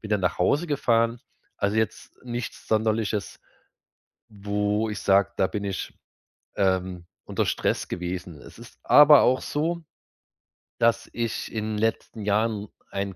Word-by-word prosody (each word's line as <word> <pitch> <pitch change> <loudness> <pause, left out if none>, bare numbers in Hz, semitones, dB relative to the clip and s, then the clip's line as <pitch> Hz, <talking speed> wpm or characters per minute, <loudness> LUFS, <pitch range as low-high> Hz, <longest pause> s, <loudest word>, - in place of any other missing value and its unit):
bin 110 - -8
dann 105 -2 +2
nach 90 - 0
Hause 145 - +2
gefahren. 115 -5 +1 0.4
Also, 100 +2 0
jetzt 110 -1 -2
nichts 120 -1 -6
Sonderliches, 110 -2 0 0.9
wo 105 +1 -1
ich 105 - -5
sage: 100 0 +3
„Da 95 - +4
bin 105 0 -4
ich, 100 -1 -4 0.6
ähm, 95 -2 0 0.2
unter - - -1
Stress - - -1
gewesen.“ 90 -2 -5
Es - - -14
ist - - -14
aber 150 -1 +8
auch 130 +1 +3
so, 165 +3 -2 1.0
dass 115 0 +2
ich 115 -2 -3
in 110 -1 -2
'n - - -2
letzten 110 0 -2
Jahren 105 0 0 0.2
ein 100 -1 -3
105 Hz, 140 wpm, -25 LUFS, 100-115 Hz, 1.0 s, aber